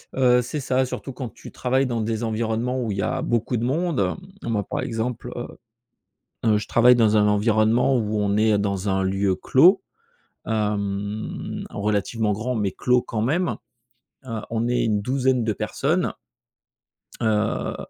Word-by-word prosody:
Heu, 125 Hz, -2 st, +4 dB
c'est 135 Hz, +5 st, -4 dB
ça 130 Hz, 0 st, +1 dB
surtout 135 Hz, +2 st, -6 dB
quand 125 Hz, -2 st, -5 dB
tu -, -, -12 dB
travailles 130 Hz, +1 st, 0 dB
dans 120 Hz, -2 st, -1 dB
des 110 Hz, +1 st, -2 dB
environnements 115 Hz, +3 st, -1 dB
où 110 Hz, -3 st, -2 dB
il 100 Hz, -, -3 dB
y -, -, 0 dB
a 130 Hz, -, -1 dB
beaucoup 120 Hz, +1 st, 0 dB
de 115 Hz, -, -2 dB
monde, 160 Hz, +3 st, 0 dB
heu. 185 Hz, -7 st, -4 dB
Moi, 105 Hz, -3 st, 0 dB
par -, -, -4 dB
exemple, 120 Hz, +1 st, -3 dB
heu 120 Hz, -, -4 dB, 1.0 s
heu, 105 Hz, -, +4 dB
je 105 Hz, -, -6 dB
travaille 125 Hz, +1 st, +6 dB
dans 110 Hz, -3 st, +3 dB
un 105 Hz, -, +4 dB
environnement 110 Hz, +4 st, +3 dB
où 110 Hz, -1 st, -1 dB
on 100 Hz, 0 st, +1 dB
est 110 Hz, -1 st, +4 dB
dans 100 Hz, -1 st, -1 dB
un 95 Hz, 0 st, +1 dB
lieu 95 Hz, 0 st, +1 dB
clos. 180 Hz, -, +5 dB, 0.6 s
Hem, 105 Hz, -1 st, -2 dB
relativement 105 Hz, +1 st, -1 dB
grand 115 Hz, +5 st, -2 dB
mais 105 Hz, -2 st, 0 dB
clos 125 Hz, 0 st, +2 dB
quand 110 Hz, -2 st, -3 dB
même. 165 Hz, +9 st, 0 dB, 0.7 s
Heu, 115 Hz, -3 st, -4 dB
on 115 Hz, +1 st, -1 dB
est 125 Hz, -1 st, +1 dB
une 105 Hz, -2 st, +1 dB
douzaine 130 Hz, +1 st, +1 dB
de 110 Hz, -1 st, 0 dB
personnes. -, -, -1 dB, 1.1 s
Heu, 110 Hz, -1 st, 0 dB
115 Hz, 170 wpm, -23 LUFS, 105-125 Hz, 1.1 s, travaille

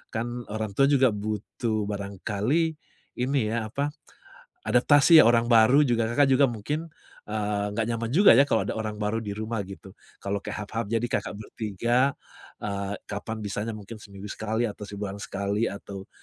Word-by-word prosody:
kan 120 Hz, +1 st, -4 dB
orang 110 Hz, 0 st, -3 dB
tua 135 Hz, +8 st, +3 dB
juga 135 Hz, -3 st, +4 dB
butuh 110 Hz, +1 st, -3 dB
barangkali, 105 Hz, -, -1 dB, 0.5 s
ini 125 Hz, -3 st, 0 dB
ya, 115 Hz, 0 st, -1 dB
apa, 145 Hz, +1 st, 0 dB, 0.8 s
adaptasi 145 Hz, +6 st, +6 dB
ya, 115 Hz, -, +6 dB
orang 115 Hz, 0 st, +4 dB
baru 120 Hz, +5 st, +5 dB
juga 115 Hz, -4 st, +1 dB
Kakak 145 Hz, +5 st, +3 dB
juga 135 Hz, +1 st, +5 dB
mungkin, 145 Hz, +9 st, -4 dB, 0.4 s
eee, 105 Hz, -1 st, -1 dB
nggak 115 Hz, -, +1 dB
nyaman 115 Hz, 0 st, -2 dB
juga 180 Hz, -, +6 dB
ya, 135 Hz, +5 st, +5 dB
kalau -, -, +2 dB
ada -, -, -2 dB
orang 110 Hz, -1 st, -4 dB
baru 105 Hz, +2 st, -1 dB
di 100 Hz, -2 st, -5 dB
rumah, 110 Hz, +1 st, -3 dB
gitu. 95 Hz, 0 st, -11 dB, 0.3 s
Kalau 100 Hz, 0 st, -1 dB
kayak 105 Hz, -, -5 dB
half -, -, -17 dB
half, 115 Hz, 0 st, -2 dB
jadi 115 Hz, +2 st, 0 dB
Kakak 120 Hz, -3 st, -2 dB
bertiga, 115 Hz, +5 st, 0 dB, 0.5 s
eee, 100 Hz, -1 st, -3 dB
kapan 105 Hz, +1 st, -5 dB
bisanya 105 Hz, +2 st, -3 dB
mungkin 110 Hz, +1 st, -10 dB
seminggu 100 Hz, -1 st, -11 dB
sekali 110 Hz, +2 st, -2 dB
atau 105 Hz, -2 st, -5 dB
sebulan 100 Hz, 0 st, -6 dB
sekali 100 Hz, +3 st, -1 dB
atau 100 Hz, 0 st, -8 dB
110 Hz, 170 wpm, -26 LUFS, 105-120 Hz, 0.8 s, adaptasi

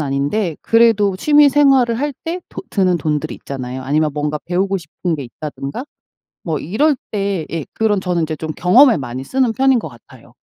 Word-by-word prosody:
아닌데 145 Hz, +6 st, -1 dB
그래도 225 Hz, -4 st, +3 dB
취미생활을 275 Hz, -2 st, +4 dB
할 290 Hz, +2 st, -1 dB
때 340 Hz, +2 st, -3 dB
도 -, -, -7 dB
드는 185 Hz, -3 st, +2 dB
돈들이 150 Hz, -1 st, -2 dB
있잖아요. 130 Hz, -1 st, -6 dB
아니면 150 Hz, +3 st, +1 dB
뭔가 150 Hz, 0 st, -2 dB
배우고 190 Hz, +3 st, 0 dB
싶은 170 Hz, +1 st, -4 dB
게 145 Hz, -, -6 dB
있다든가 140 Hz, -, -7 dB, 0.6 s
뭐 160 Hz, -4 st, -2 dB
이럴 275 Hz, -, +1 dB, 0.2 s
때 195 Hz, -5 st, -2 dB
예. 165 Hz, -3 st, -3 dB
그런 215 Hz, -3 st, +1 dB
저는 180 Hz, -2 st, -1 dB
인제 155 Hz, 0 st, -3 dB
좀 160 Hz, +1 st, -5 dB
경험에 235 Hz, -, +5 dB
많이 130 Hz, -1 st, -6 dB
쓰는 260 Hz, -, +1 dB
편인 265 Hz, +2 st, +3 dB
것 -, -, -7 dB
같아요. -, -, -18 dB
185 Hz, 360 characters per minute, -18 LUFS, 150-235 Hz, 0.6 s, 경험에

